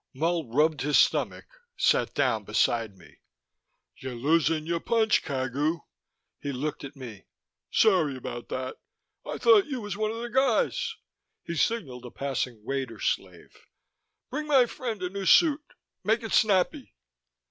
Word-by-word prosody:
Mull 165 +1 0
rubbed 150 +3 +2
his 145 +1 +2
stomach, - - +2 0.3
sat - - +2
down - - +1
beside 115 -4 0
me. 90 - -18 0.8
"Ya 130 -1 -6
losin' 155 +5 +1
your 170 +1 -1
punch, 220 +2 +2
Cagu." 140 +4 -2 0.6
He 145 - -4
looked 145 +4 -4
at 140 +1 -8
me. 120 -7 -10 0.4
"Sorry 175 -11 +3
about 120 -1 -7
that. 130 0 -4 0.5
I - - -4
thought 420 -6 +5
you 265 -4 -3
was 205 -3 -5
one 215 +1 -1
of 225 - -4
the 240 0 -5
guys." 265 - +1 0.5
He 170 - -5
signaled 140 - -1
a - - -8
passing 130 -4 -4
waiter 130 -5 -3
slave. - - -3 0.8
"Bring 300 +3 -3
my 270 -4 +5
friend 230 -5 -5
a 180 - -1
new 195 -1 -4
suit. 310 -3 +5 0.4
Make 220 +4 +1
it 225 - -5
snappy." 190 - +2
165 Hz, 145 wpm, -27 LUFS, -, 0.8 s, thought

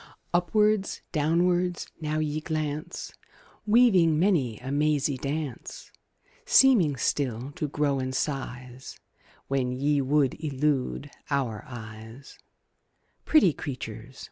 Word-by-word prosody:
Upwards, 210 +3 +1
downwards, 175 +3 +1 0.2
now 155 0 -1
ye 155 0 -1
glance, 155 -1 -4 0.5
Weaving 200 -9 +5
many 155 - +1
a 130 +4 -7
mazy 145 -1 +1
dance; 145 - -5 0.5
Seeming 215 - +5
still 125 0 -1
to 155 0 -3
grow 145 -1 0
in 130 0 -2
size 130 -2 -5 0.5
When 130 -2 0
ye 140 +3 +1
would 140 +2 +1
elude 145 -1 -1 0.2
our 125 -7 -1
eyes 110 +2 -10 0.9
Pretty 235 - +5
creatures! 125 -2 -7
145 Hz, 100 wpm, -27 LUFS, 130-160 Hz, 0.9 s, Weaving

